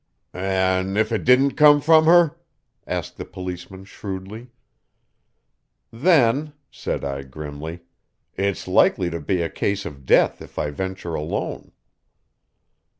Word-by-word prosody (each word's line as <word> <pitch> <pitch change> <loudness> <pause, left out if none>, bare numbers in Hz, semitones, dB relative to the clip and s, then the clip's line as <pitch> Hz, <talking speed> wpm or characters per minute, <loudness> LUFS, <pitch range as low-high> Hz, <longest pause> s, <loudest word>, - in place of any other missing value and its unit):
"An' 95 +1 0
if 110 +1 +1
it 110 - -1
didn't 130 +3 +4
come 150 0 +6
from 160 +2 +5
her?" 170 -2 +5 0.5
asked - - -4
the - - -5
policeman 90 +1 -8
shrewdly. 100 +4 -8 1.4
"Then," 145 +1 +2 0.2
said - - -4
I 70 -1 -3
grimly, 75 +4 -8 0.5
"it's 100 -2 -2
likely 90 -2 +3
to 85 - -4
be 85 +3 -1
a - - -1
case 100 0 -2
of 70 -2 -9
death - - +3
if - - -13
I 75 - -1
venture 95 +2 -5
alone." 75 -1 -4
95 Hz, 125 wpm, -22 LUFS, 85-125 Hz, 1.4 s, come